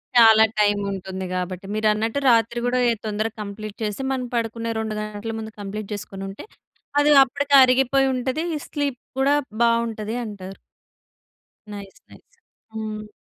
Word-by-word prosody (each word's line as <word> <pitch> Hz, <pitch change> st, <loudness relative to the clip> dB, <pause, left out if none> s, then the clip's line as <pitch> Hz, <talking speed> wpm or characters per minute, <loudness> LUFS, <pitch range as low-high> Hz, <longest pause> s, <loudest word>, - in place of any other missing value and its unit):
చాలా 225 Hz, -2 st, +8 dB, 0.2 s
టైమ్ 205 Hz, -1 st, +3 dB
ఉంటుంది 190 Hz, -1 st, -5 dB
గాబట్టి. 185 Hz, +1 st, -4 dB
మీరన్నట్టు 215 Hz, +3 st, +1 dB
రాత్రి 230 Hz, 0 st, +3 dB
గూడా 250 Hz, +1 st, +1 dB
ఎ -, -, +2 dB
తొందరగా 215 Hz, +1 st, -2 dB
కంప్లీట్ 210 Hz, 0 st, -7 dB
చేసి 210 Hz, +3 st, -3 dB
మనం 260 Hz, -1 st, -2 dB
పడుకునే 230 Hz, 0 st, -2 dB
2 220 Hz, -1 st, -3 dB
గంటల 215 Hz, +1 st, -5 dB
ముందు 220 Hz, 0 st, -7 dB
కంప్లీట్ 205 Hz, +1 st, -6 dB
చేసుకొని 195 Hz, -1 st, -7 dB
ఉంటే 195 Hz, -, -9 dB, 0.5 s
అది 290 Hz, +1 st, +4 dB
అప్పడికి 280 Hz, +2 st, -3 dB
అరిగిపోయి 270 Hz, +1 st, +3 dB
ఉంటది. 260 Hz, +5 st, -2 dB, 0.2 s
స్లీప్ 285 Hz, -4 st, -2 dB, 0.2 s
గూడా 275 Hz, +2 st, +3 dB, 0.3 s
బావుంటది 230 Hz, -2 st, 0 dB
అంటారు. 195 Hz, -3 st, -8 dB, 1.2 s
నైస్. 200 Hz, -1 st, -10 dB
నైస్. -, -, -17 dB, 0.5 s
హ్మ్. 215 Hz, -1 st, -5 dB
220 Hz, 135 wpm, -23 LUFS, 205-240 Hz, 1.2 s, చాలా